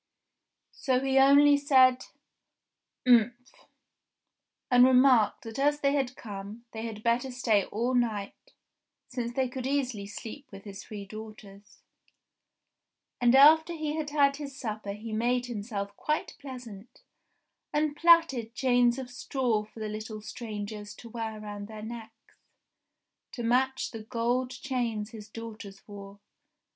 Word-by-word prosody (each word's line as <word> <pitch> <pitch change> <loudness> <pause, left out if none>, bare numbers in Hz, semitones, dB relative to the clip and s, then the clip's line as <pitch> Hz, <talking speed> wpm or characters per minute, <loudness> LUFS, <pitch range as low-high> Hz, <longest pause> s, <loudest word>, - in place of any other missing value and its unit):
So 260 -3 0
he 270 0 +2
only 285 +1 +7
said, 260 -3 +4 1.0
"Umph!" 245 +1 +2 1.0
and 245 0 +7
remarked 255 -3 +5
that 225 +3 -7
as 290 +1 +2
they 275 0 +2
had 265 -3 -1
come, 205 +2 -8
they 220 - -6
had 215 -1 -8
better 240 +3 +1
stay 230 -5 +1
all 235 +4 -2
night, 220 -5 -2 0.6
since 245 -2 -3
they 260 +1 0
could 255 0 -5
easily 255 -7 -1
sleep 235 +7 -9
with 195 -1 -11
his 200 -2 -9
three 205 -2 -8
daughters. 210 -1 -12 1.4
And 240 +1 +5
after 315 +5 +7
he 310 -2 -3
had 310 -2 -3
had 280 -1 +3
his 280 -2 -8
supper 215 -3 -4
he 215 +2 -7
made 245 +3 +1
himself 205 -3 -5
quite 305 +7 -2
pleasant, 245 -6 -10 0.7
and 295 0 0
plaited 300 -9 +4
chains 245 -2 +3
of 260 -2 -5
straw 250 -4 -1
for 215 +1 -15
the 215 - -3
little 215 +1 -6
strangers 210 -2 -7
to 230 - -12
wear 225 -1 -5
round 205 -1 -7
their 215 -1 -9
necks, 225 0 -10 1.0
to 240 - -5
match 260 +3 +1
the 225 - -7
gold 245 +2 -1
chains 245 -4 -3
his 215 -3 -10
daughters 215 -3 -10
wore. 200 -1 -11
240 Hz, 135 wpm, -28 LUFS, 215-265 Hz, 1.4 s, only